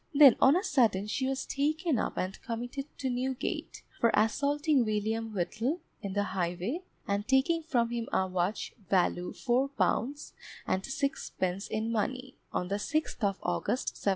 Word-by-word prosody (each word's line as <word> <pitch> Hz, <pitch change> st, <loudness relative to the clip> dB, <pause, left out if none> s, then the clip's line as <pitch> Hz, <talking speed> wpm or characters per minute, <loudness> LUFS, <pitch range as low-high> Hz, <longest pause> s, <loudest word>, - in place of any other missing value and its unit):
Then 280 Hz, -4 st, +9 dB
on 270 Hz, +4 st, +7 dB
a 370 Hz, -, +1 dB
sudden 230 Hz, -, +3 dB
she 260 Hz, +5 st, -1 dB
was 270 Hz, 0 st, -2 dB
taken 305 Hz, 0 st, 0 dB
up -, -, -2 dB
and 185 Hz, +1 st, -3 dB
committed 245 Hz, +4 st, -4 dB
to 265 Hz, -, -2 dB
Newgate, 255 Hz, +1 st, -3 dB, 0.2 s
for 230 Hz, -, +4 dB
assaulting 285 Hz, +5 st, +2 dB
William 220 Hz, +1 st, -1 dB
Whittle, 215 Hz, -, -1 dB, 0.2 s
in 195 Hz, -1 st, -4 dB
the 205 Hz, 0 st, +1 dB
highway, 185 Hz, -, -2 dB, 0.3 s
and 200 Hz, +1 st, -1 dB
taking 265 Hz, +6 st, +3 dB
from 245 Hz, -7 st, +1 dB
him 235 Hz, -1 st, -3 dB
a 190 Hz, -, +2 dB
watch 185 Hz, +2 st, -1 dB, 0.2 s
value 180 Hz, -1 st, +2 dB
£4, 270 Hz, +1 st, 0 dB, 0.3 s
and 190 Hz, -, 0 dB
sixpence 200 Hz, -8 st, -2 dB
in 220 Hz, +1 st, -2 dB
money, 255 Hz, +4 st, -2 dB, 0.2 s
on 180 Hz, -, -2 dB
the 200 Hz, -, 0 dB
6th 310 Hz, +1 st, -1 dB
of 195 Hz, -1 st, +2 dB
August, 175 Hz, +8 st, 0 dB
1726. -, -, -10 dB
235 Hz, 155 wpm, -30 LUFS, 200-275 Hz, 0.3 s, Then